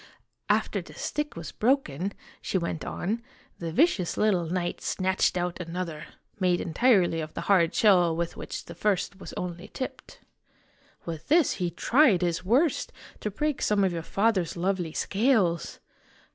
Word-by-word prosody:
"After - - +1
the - - -14
stick 295 0 -3
was 165 -4 -7
broken," 200 - 0 0.3
she - - -1
went 170 -2 -3
on, 220 +6 -3 0.4
"the 165 -1 -4
vicious 200 - +2
little 190 -6 +2
knight 175 +1 -2
snatched 190 0 +1
out 175 0 -2
another, 165 -2 -5 0.3
made 180 -2 +2
entirely 180 -3 +3
of 155 0 -7
the - - -3
hard 180 -4 +3
shell 180 -6 +5
with 170 0 -2
which - - -6
the - - -9
first 200 -1 -1
was - - -8
only 180 +1 -5
tipped. 260 - -7 0.9
With 165 -2 -6
this 320 +1 +4
he 175 - +1
tried 210 - +3
his 170 0 0
worst 260 - +2 0.3
to 210 - -2
break 300 +7 -2
some 205 -1 +2
of 185 -2 +2
your 165 - -3
father's 195 -1 0
lovely 180 -2 -1
scales. 200 - +1
185 Hz, 155 wpm, -27 LUFS, 170-215 Hz, 0.9 s, shell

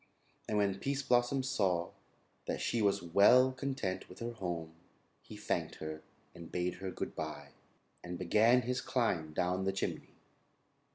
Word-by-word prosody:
And 105 - +1
when 100 -2 +1
Pease 140 +3 -1
Blossom 125 +2 +2
saw 95 -9 0 0.6
that - - -2
she 115 - 0
was 100 -2 +2
well 105 +9 +6
content 130 -8 -3
with 90 - -12
her 115 +1 -4
home, 85 -7 -4 0.5
he - - -11
thanked - - -2
her 80 0 -6 0.3
and 85 - -11
bade 90 0 -1
her 95 0 -4
good - - -5
bye, 75 -2 -5 0.5
and 90 0 -5
began 110 +8 +4
his 125 +2 -1
climb 90 -11 0
down 90 +4 0
the 95 - +1
chimney. 95 - -4
95 Hz, 155 wpm, -33 LUFS, 85-120 Hz, 0.6 s, well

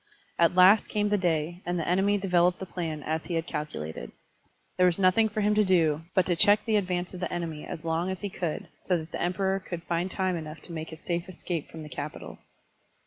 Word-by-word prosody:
At 170 +1 +4
last 185 +4 +7
came 210 -1 0
the 205 - +3
day, 170 0 0
and 175 0 -2
the 165 - -2
enemy 195 +3 +3
developed 180 -2 +2
the 190 - -6
plan 165 -5 -4
as 160 +1 -2
he 175 - -3
had 165 0 -1
calculated. 80 - -5 0.7
There 180 - +5
was 175 - +1
nothing 195 +4 +4
for 215 +1 -2
him 210 +1 +3
to 210 0 +4
do 165 -5 +3
but 185 - +4
to 175 - +1
check 205 +4 +5
the 220 -2 +1
advance 180 -3 -1
of 180 - -7
the 180 - -3
enemy 165 -3 -4
as 155 - -6
long 165 +2 0
as 190 -1 -4
he 205 - -3
cotdd, 170 -5 -3 0.2
so 180 - +1
that 160 0 -8
the - - -4
Emperor 190 +2 0
could 175 -3 -7
find 175 +1 -1
time 185 -1 -1
enough 155 -1 -6
to - - -10
make 160 -1 -5
his 160 0 -10
safe 170 +1 -3
escape 170 -3 -4
from 160 -1 -9
the - - -8
capital. 150 +1 -7
175 Hz, 235 wpm, -28 LUFS, 165-190 Hz, 0.7 s, last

